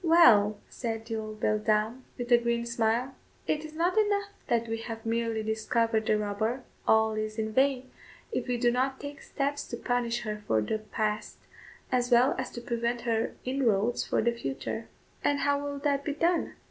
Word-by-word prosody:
"Well," 230 - +6
said 225 -2 -4
the 225 -1 -3
old 215 -1 -6
beldame, 215 +3 +1 0.2
with 245 0 -5
a 240 - +9
grim 235 0 0
smile, 235 +2 0 0.3
"it 305 0 0
is 310 0 -9
not 345 +3 +1
enough 410 -1 +1 0.2
that 235 -1 +1
we 225 0 -2
have 225 0 -7
merely 225 -1 0
discovered 220 0 0
the 215 - +4
robber; 215 +5 -1 0.2
all 220 0 +5
is 215 0 -3
in 220 0 -2
vain, 260 0 +2 0.4
if - - -2
we 250 -1 0
do 240 0 +3
not 260 +2 0
take 285 0 -7
steps 285 0 -2
to 235 - -5
punish 240 -1 0
her 210 -2 -4
for 110 - +3
the 165 - -1
past, 215 0 -2 0.5
as 245 -1 +1
well 245 +2 +5
as 260 - -2
to 240 - -6
prevent 235 0 -1
her 230 -1 0
inroads 240 -4 +1
for - - 0
the 235 - +3
future." 225 +2 -4 0.4
"And 285 -1 +2
how 285 0 +2
will 285 0 -3
that 280 -1 0
be 295 - -2
done?" 335 +3 +1
235 Hz, 185 wpm, -29 LUFS, 220-265 Hz, 0.5 s, a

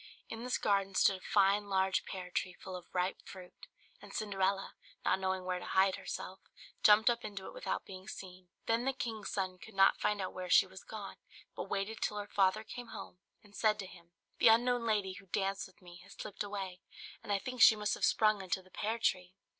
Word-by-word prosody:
In 225 +1 -6
this 250 +1 0
garden 195 -1 +1
stood 195 - +4
a - - -19
fine 200 +1 +3
large 190 -1 +1
pear 180 -1 -6
tree 185 - -1
full 185 +1 -8
of 180 -1 -9
ripe 180 +1 -1
fruit; 185 -2 -12 0.3
and - - -12
Cinderella, 195 -2 -1 0.3
not - - +3
knowing 190 -1 -1
where 180 -1 -1
to - - -8
hide 190 0 +3
herself, 190 - -6 0.4
jumped 210 +1 +6
up 235 -1 +3
into 200 -2 -6
it - - -8
without - - -3
being 185 0 -10
seen. 185 -1 -9 0.2
Then 230 +2 +1
the 270 - +1
king's 225 -4 -4
son 185 -2 -2
could 220 +1 -13
not 195 0 +5
find 210 0 +1
out 185 - -3
where 185 -1 -6
she - - +7
was 190 0 -12
gone, 210 -3 -8 0.4
but - - -5
waited 200 +3 -2
till 210 - -1
her 205 - -3
father 200 +1 +2
came 245 +2 -8
home, 195 -4 -9 0.2
and 205 -1 -18
said 215 -1 +3
to 200 - -5
him, 170 -2 -15 0.3
"The - - +6
unknown 235 +1 +4
lady 205 -4 +1
who 195 +1 -13
danced 195 +1 -1
with 190 - -23
me 175 -1 -12
has 195 +2 -14
slipped 205 - -7
away, 195 -3 -4 0.4
and - - -6
I 200 - +3
think 255 +4 -5
she 220 - +10
must 210 0 -1
have - - -4
sprung 215 -2 +4
into 190 0 -2
the 185 - -22
pear 220 +5 -2
tree." 185 -4 0
195 Hz, 220 wpm, -34 LUFS, 185-215 Hz, 0.4 s, she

